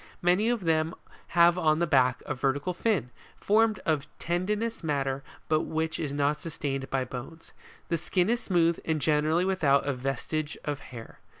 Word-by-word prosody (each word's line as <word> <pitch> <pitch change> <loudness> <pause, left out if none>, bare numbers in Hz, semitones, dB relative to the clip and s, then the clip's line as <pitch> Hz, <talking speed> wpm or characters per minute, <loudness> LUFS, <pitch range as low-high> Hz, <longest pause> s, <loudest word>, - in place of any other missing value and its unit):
Many 180 +6 +3
of 240 -5 0
them 160 0 +1 0.4
have 170 +1 +6
on 155 -2 +3
the 170 - +2
back 130 -5 +2
a - - -2
vertical 140 +6 -1
fin, 175 - 0 0.3
formed 220 +1 +3
of 155 -3 0
tendinous 205 +6 -2
matter 140 -3 -1 0.2
but 155 0 +3
which 160 0 -2
is 150 -3 -2
not 145 +1 0
sustained 140 -5 -4
by 135 -1 0
bones. 135 +6 -9 0.4
The 170 - 0
skin 180 +2 +1
is 235 +2 +1
smooth, 170 -3 +2
and 160 -1 0
generally 155 +4 +2
without 155 -8 +2
a 140 - 0
vestige 135 +4 -3
of 145 -1 -2
hair. 120 -5 -11
155 Hz, 170 wpm, -28 LUFS, 140-175 Hz, 0.4 s, have